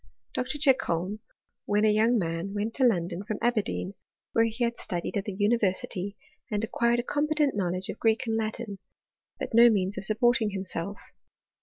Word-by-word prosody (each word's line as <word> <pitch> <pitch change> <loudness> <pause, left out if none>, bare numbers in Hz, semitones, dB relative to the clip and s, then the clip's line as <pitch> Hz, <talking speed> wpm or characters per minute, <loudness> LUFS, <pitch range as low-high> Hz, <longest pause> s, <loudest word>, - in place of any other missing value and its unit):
Mr. 250 - -1
Chicholm, 215 - +2 0.5
when 210 +1 +2
a 215 - +5
young 225 +3 +3
man, 170 +1 -2
went 210 +2 -2
to 270 - 0
London 180 -5 +1
from 210 0 -4
Aberdeen, 220 -5 0 0.4
where 225 - +4
he 230 +2 -2
had 235 0 0
studied 175 -2 -4
at 200 - -1
the 200 -3 -5
univer 205 -2 +2
sity, 195 +2 -3 0.3
and 210 -1 -1
acquired 235 +1 +1
a - - -1
competent 295 0 +1
knowledge 185 -1 -1
of - - -5
Greek 225 +3 +2
and 225 -1 -1
Latin, 220 -2 -2 0.6
but - - -5
no 235 +1 +8
means 195 -2 0
of - - -6
supporting 225 0 +2
himself. 195 0 -5
215 Hz, 175 wpm, -27 LUFS, 195-235 Hz, 0.6 s, no